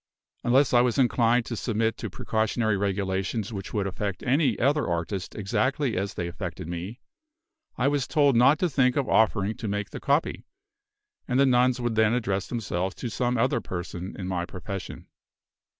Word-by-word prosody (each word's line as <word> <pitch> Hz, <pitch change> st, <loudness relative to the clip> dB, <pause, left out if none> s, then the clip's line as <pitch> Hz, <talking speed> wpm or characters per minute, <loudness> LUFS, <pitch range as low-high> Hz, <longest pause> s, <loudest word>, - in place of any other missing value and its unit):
Unless 130 Hz, +3 st, +3 dB
I 120 Hz, -, +6 dB
was 125 Hz, -2 st, +1 dB
inclined 120 Hz, -2 st, +3 dB
to 120 Hz, -, -4 dB
submit 110 Hz, 0 st, 0 dB
to 115 Hz, -, -5 dB
precautionary 110 Hz, +2 st, 0 dB
regulations 100 Hz, +2 st, -2 dB
which 95 Hz, -2 st, -6 dB
would 100 Hz, -2 st, -1 dB
affect 100 Hz, 0 st, -3 dB
any 140 Hz, +3 st, +2 dB
other 145 Hz, +4 st, +2 dB
artist 85 Hz, +2 st, -3 dB
exactly 130 Hz, +6 st, 0 dB
as 95 Hz, +2 st, -2 dB
they 85 Hz, -, -3 dB
affected 85 Hz, -2 st, -6 dB
me, 90 Hz, +8 st, -6 dB, 0.8 s
I 125 Hz, -, +2 dB
was 140 Hz, -2 st, 0 dB
told 145 Hz, -4 st, +3 dB
not 130 Hz, +6 st, +6 dB
to 180 Hz, -, +3 dB
think 130 Hz, -4 st, +2 dB
of 140 Hz, -3 st, 0 dB
offering 110 Hz, -2 st, +2 dB
to 120 Hz, -3 st, -5 dB
make 105 Hz, +1 st, -3 dB
the -, -, -6 dB
copy; 140 Hz, +3 st, 0 dB, 0.8 s
and 125 Hz, 0 st, +1 dB
the 140 Hz, -, +6 dB
nuns 125 Hz, -1 st, +3 dB
would 120 Hz, -1 st, -1 dB
then 110 Hz, 0 st, +3 dB
address 100 Hz, -5 st, -1 dB
themselves 95 Hz, -5 st, -3 dB
to 120 Hz, -, -5 dB
some 125 Hz, +1 st, 0 dB
other 120 Hz, 0 st, +1 dB
person 90 Hz, +1 st, -6 dB
in 90 Hz, -, -5 dB
my 90 Hz, -2 st, -1 dB
profession. 90 Hz, +1 st, -7 dB
110 Hz, 175 wpm, -26 LUFS, 95-125 Hz, 0.8 s, I